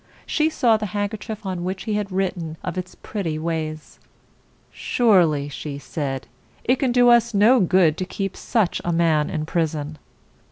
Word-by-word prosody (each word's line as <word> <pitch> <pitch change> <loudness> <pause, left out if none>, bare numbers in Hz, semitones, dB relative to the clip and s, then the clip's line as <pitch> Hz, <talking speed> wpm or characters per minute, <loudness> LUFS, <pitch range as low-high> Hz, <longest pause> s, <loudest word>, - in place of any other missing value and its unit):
She 310 0 +1
saw 235 -7 +3
the 215 0 -3
handkerchief 210 +1 -4
on 185 -2 -3
which 185 +1 -3
he 215 - -2
had 205 -1 -2
written 180 -4 -2
of 180 - -4
its 185 0 -5
pretty 170 -7 -4
ways. 155 -1 -4 0.7
"Surely," 175 - +2
she 145 0 -6
said, 140 -2 -4 0.4
"it 255 - +2
can 260 -2 +1
do 245 0 +5
us 235 -2 +4
no 225 +6 +6
good 180 -4 +3
to 185 - -2
keep 195 0 -4
such 220 -7 0
a 175 - -1
man 165 -3 +2
in 155 -1 -3
prison." 155 -2 -2
185 Hz, 165 wpm, -22 LUFS, 155-215 Hz, 0.7 s, no